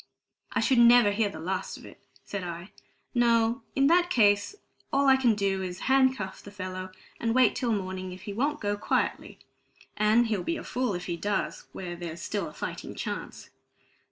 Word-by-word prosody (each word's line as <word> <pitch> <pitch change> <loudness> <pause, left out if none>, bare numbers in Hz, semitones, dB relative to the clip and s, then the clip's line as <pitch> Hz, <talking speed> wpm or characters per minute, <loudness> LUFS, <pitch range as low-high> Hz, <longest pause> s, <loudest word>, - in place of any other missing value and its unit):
"I - - +1
should 260 -3 +3
never 235 -3 +7
hear 205 0 +1
the 160 - -9
last 185 +3 -3
of - - -13
it," - - -14 0.2
said 200 -2 -5
I. 175 +2 -7 0.4
"No, 235 0 +3
in 275 - +3
that 350 +4 +4
case 205 - +3 0.4
all 280 0 +2
I 265 - +7
can 245 -4 +3
do 195 -2 0
is 180 -1 -4
to - - -9
handcuff 260 -7 +2
the - - -11
fellow 185 -2 -6 0.3
and 230 0 0
wait 255 -3 +5
till 240 -2 -1
morning 185 -2 -3
if 185 +1 -10
he 205 - -5
won't 290 +7 0
go 205 0 -1
quietly; - - -1 0.6
and 215 +3 +4
he'll 215 -4 -1
be 335 - -2
a - - -7
fool 250 -5 -1
if 180 - -5
he 170 -1 -3
does, 200 +2 -2
while 175 -2 -6
there's 170 -1 -7
a - - -2
fighting - - -6
chance." - - -6
205 Hz, 190 wpm, -28 LUFS, 185-245 Hz, 0.6 s, never